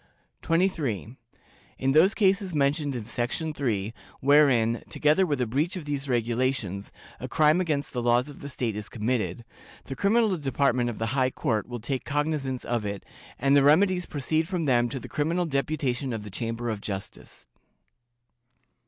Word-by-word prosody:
"23. 155 - 0 0.6
In 135 0 +1
those 175 +9 +5
cases 195 -3 +2
mentioned 145 0 +1
in 115 -4 -5
section 120 +7 -2
3, 110 -7 -2 0.3
wherein, 130 -5 +4
together 155 +5 +2
with 145 -4 -1
a 125 - +1
breach 145 - -1
of 175 -5 -6
these 140 -1 -3
regulations, 120 -4 -1 0.3
a 130 - -5
crime 155 +5 +3
against 150 -5 -2
the 125 - -1
laws 120 +2 +2
of 145 - -11
the 140 - -7
state 120 -5 -2
is 105 0 -6
committed, 110 -3 -2 0.4
the 135 - -6
criminal 215 - +2
department 130 -3 +1
of 120 - -5
the 115 +2 -2
High 130 -2 +2
Court 110 -4 -1
will 120 -1 -5
take 125 +3 -3
cognizance 145 -3 -2
of 120 -2 -1
it, 100 -1 -5 0.3
and 140 +2 +3
the 140 - +6
remedies 180 +5 +4
proceed 155 +3 -1
from 180 -2 -2
them 120 -4 +2
to 135 - -4
the - - -9
criminal 165 +4 0
deputation 140 -3 -1
of 110 -2 -4
the 105 - -9
Chamber 115 +3 -3
of 105 -2 -5
Justice. 95 -2 -7
135 Hz, 170 wpm, -26 LUFS, 120-150 Hz, 0.6 s, the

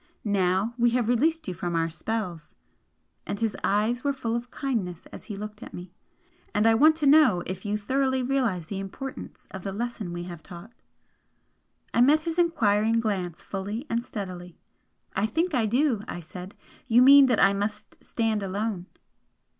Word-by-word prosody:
Now 195 +2 +1
we 240 0 +5
have 240 -3 0
released 310 +8 +1
you 185 - -2
from 175 0 -3
our 165 0 +1
spells!" 175 -2 -5 0.7
and 200 - -3
his 225 -3 -1
eyes 220 +5 +1
were 285 -1 +1
full 235 -4 -2
of 240 +1 -4
kindness 215 - -3
as - - -10
he 210 - -6
looked 210 +2 -8
at - - -9
me 180 0 -9 0.6
"and 210 +1 +3
I 225 - +6
want 305 +7 +6
to 310 -2 -2
know 280 - +5
if 185 +2 -6
you 210 0 0
thoroughly 260 +4 0
realise 245 -10 0
the 195 +3 -5
importance 255 +8 -8
of 190 - -7
the 195 - -3
lesson 220 -3 -4
we 175 0 -5
have 175 -2 -8
taught?" 180 +7 -11 1.2
I 235 - +3
met 295 +5 +5
his 330 +1 -3
enquiring 225 -9 +2
glance 190 -7 -2
fully 205 +6 -5
and 230 +1 0
steadily. 180 -6 -7 0.6
"I 195 +3 +1
think 330 +8 -1
I 235 -5 +2
do," 245 -1 +2
I - - -5
said 180 +3 -10 0.3
"You 240 +1 +6
mean 275 +1 +9
that 245 -3 +2
I 195 0 +5
must 205 +1 -4
stand 225 -2 -1
alone?" 195 -1 -3
215 Hz, 180 wpm, -26 LUFS, 190-250 Hz, 1.2 s, mean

